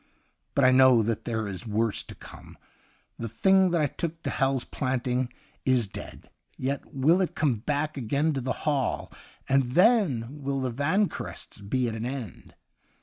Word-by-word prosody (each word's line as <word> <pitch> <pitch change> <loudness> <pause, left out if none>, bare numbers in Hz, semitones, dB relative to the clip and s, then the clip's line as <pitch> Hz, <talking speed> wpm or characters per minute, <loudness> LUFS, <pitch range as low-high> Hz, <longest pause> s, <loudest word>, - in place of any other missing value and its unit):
But 140 - +4
I 130 - +7
know 130 -3 +6
that 115 0 -2
there 110 -2 -2
is 100 +4 -6
worse 110 0 +1
to - - -11
come. - - -13 0.6
The 115 - -3
thing 190 - +4
that 170 -2 +1
I - - +3
took 165 +3 -4
to - - -2
Hal's 135 -1 +1
Planting 125 -1 -1 0.3
is 130 -3 +3
dead. 100 - -10 0.3
Yet 135 +2 -3
will 155 +8 +3
it 185 - -1
come 140 -7 +1
back 145 +6 -2
again 140 +6 0
to 135 - -2
the 130 - -2
Hall, 145 -4 -1 0.3
and 135 +1 +4
then 180 - +4 0.2
will 135 0 -1
the 130 -2 -1
Vanquerests 160 - -2
be 125 +5 0
at 115 - -3
an 110 +2 -3
end. 125 -7 -7
130 Hz, 170 wpm, -27 LUFS, 120-150 Hz, 0.6 s, I